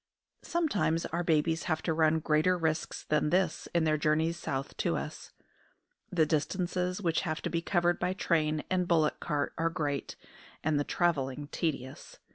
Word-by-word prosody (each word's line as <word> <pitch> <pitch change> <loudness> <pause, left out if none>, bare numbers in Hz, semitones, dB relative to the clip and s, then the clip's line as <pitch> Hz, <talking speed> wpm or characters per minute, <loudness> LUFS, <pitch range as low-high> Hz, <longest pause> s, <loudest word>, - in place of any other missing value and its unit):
Sometimes 180 - 0
our 170 +2 -2
babies 160 0 +1
have 160 -2 -1
to 165 - +1
run 160 0 +3
greater 155 +4 +3
risks 160 -2 -1
than 150 0 +1
this 180 -1 +1
in 170 -1 +2
their 155 -1 +2
journeys 160 +2 +2
south 135 -5 -4
to - - 0
us. - - -7 0.8
The 165 -3 +3
distances 180 +4 -1
which 165 -2 +1
have 155 -3 -3
to - - -2
be 170 - 0
covered 175 0 +1
by 185 - 0
train 155 -4 +1
and 180 -1 0
bullock 160 -3 +2
cart 145 -3 -1
are 165 0 +2
great, 150 -5 -3 0.5
and 150 -1 +2
the - - +1
travelling 145 -4 0
tedious. 135 -6 -4
160 Hz, 165 wpm, -30 LUFS, 155-175 Hz, 0.8 s, run